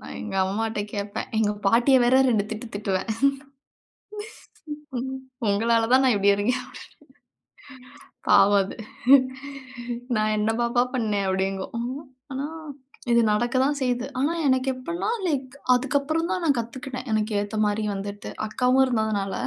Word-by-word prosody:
நான் -, -, -9 dB
எங்க 210 Hz, -3 st, -6 dB
அம்மாட்ட 220 Hz, +2 st, -2 dB
கேப்பேன். 200 Hz, 0 st, -4 dB
எங்க 210 Hz, -1 st, +2 dB
பாட்டிய 240 Hz, +6 st, +5 dB
வேற 250 Hz, +2 st, +4 dB
2 215 Hz, -4 st, +2 dB
திட்டு 220 Hz, +2 st, -5 dB
திட்டுவேன். 200 Hz, 0 st, -2 dB, 2.4 s
உங்களால 225 Hz, +3 st, +2 dB
தான் 265 Hz, +1 st, +6 dB
நான் 250 Hz, -5 st, +4 dB
இப்படி 200 Hz, 0 st, +4 dB
இருக்கேன் 245 Hz, +6 st, 0 dB
அப்டினு. -, -, -17 dB, 1.6 s
பாவம் 200 Hz, 0 st, +6 dB
அது. 190 Hz, -, -8 dB, 1.4 s
நான் 215 Hz, 0 st, +1 dB
என்ன 210 Hz, +1 st, +1 dB
பாப்பா 240 Hz, +1 st, +2 dB
பண்ணேன் 210 Hz, -5 st, 0 dB
அப்படிங்கும். 195 Hz, +5 st, -2 dB, 0.5 s
ஆனா 270 Hz, +2 st, -3 dB, 0.7 s
இது 235 Hz, 0 st, +5 dB
நடக்க 240 Hz, +4 st, 0 dB
தான் 290 Hz, +1 st, +1 dB
செய்யுது. 250 Hz, -1 st, 0 dB
ஆனா 290 Hz, +5 st, +1 dB
எனக்கு 260 Hz, 0 st, +2 dB
எப்படின்னா 335 Hz, +10 st, -4 dB, 0.2 s
லைக் 270 Hz, -4 st, -2 dB, 0.2 s
அதுக்கப்புறம் 285 Hz, +6 st, 0 dB
தான் 365 Hz, -, -1 dB
நான் 280 Hz, -5 st, +3 dB
கத்துக்கிட்டேன். 255 Hz, +3 st, -6 dB
எனக்கு 215 Hz, 0 st, 0 dB
ஏத்தா 205 Hz, +1 st, -4 dB
மாரி 210 Hz, +1 st, 0 dB
வந்துட்டு, 200 Hz, +1 st, -6 dB, 0.2 s
அக்காவும் 250 Hz, +4 st, +3 dB
இருந்ததுனால, 220 Hz, -5 st, -1 dB
230 Hz, 130 wpm, -25 LUFS, 205-255 Hz, 2.4 s, தான்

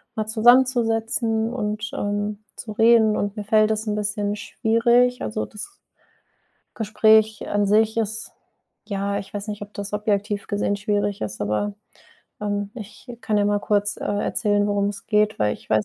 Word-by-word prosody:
mal 215 Hz, -1 st, -2 dB
zusammenzusetzen 225 Hz, 0 st, +3 dB
und, 215 Hz, -2 st, -3 dB
ähm, 205 Hz, 0 st, -2 dB, 0.2 s
zu 215 Hz, -, -7 dB
reden 225 Hz, -1 st, +4 dB
und 205 Hz, 0 st, -2 dB
mir 210 Hz, -, -3 dB
fällt 215 Hz, 0 st, +3 dB
das 215 Hz, +1 st, -2 dB
'n 210 Hz, -, 0 dB
bisschen 210 Hz, 0 st, -2 dB
schwierig. 235 Hz, +3 st, +2 dB
Also 110 Hz, 0 st, -3 dB
das 210 Hz, -, -8 dB, 1.1 s
Gespräch 220 Hz, 0 st, +3 dB
an 205 Hz, 0 st, +1 dB
sich 215 Hz, +2 st, +3 dB
ist, 220 Hz, 0 st, -3 dB, 0.5 s
ja 200 Hz, -1 st, -2 dB
Ich 195 Hz, -1 st, -8 dB
weiß 205 Hz, +1 st, -5 dB
nicht, 210 Hz, -1 st, -5 dB
ob 205 Hz, 0 st, -14 dB
das 205 Hz, 0 st, -6 dB
objektiv 205 Hz, 0 st, -1 dB
gesehen 205 Hz, 0 st, 0 dB
schwierig 205 Hz, -1 st, -1 dB
ist, 110 Hz, 0 st, -4 dB
aber, 105 Hz, -, -1 dB, 0.7 s
ähm, 205 Hz, -1 st, -2 dB
ich 235 Hz, +2 st, -10 dB
kann 210 Hz, -1 st, +1 dB
ja 205 Hz, -, +2 dB
mal 205 Hz, 0 st, +1 dB
kurz, 205 Hz, 0 st, 0 dB
äh, -, -, -6 dB
erzählen, 205 Hz, 0 st, 0 dB
worum 205 Hz, -1 st, +1 dB
es 205 Hz, -1 st, -7 dB
geht, 210 Hz, -1 st, +2 dB
weil 105 Hz, -1 st, +1 dB
ich -, -, -17 dB
weiß 110 Hz, -1 st, +3 dB
210 Hz, 165 wpm, -23 LUFS, 205-220 Hz, 1.1 s, reden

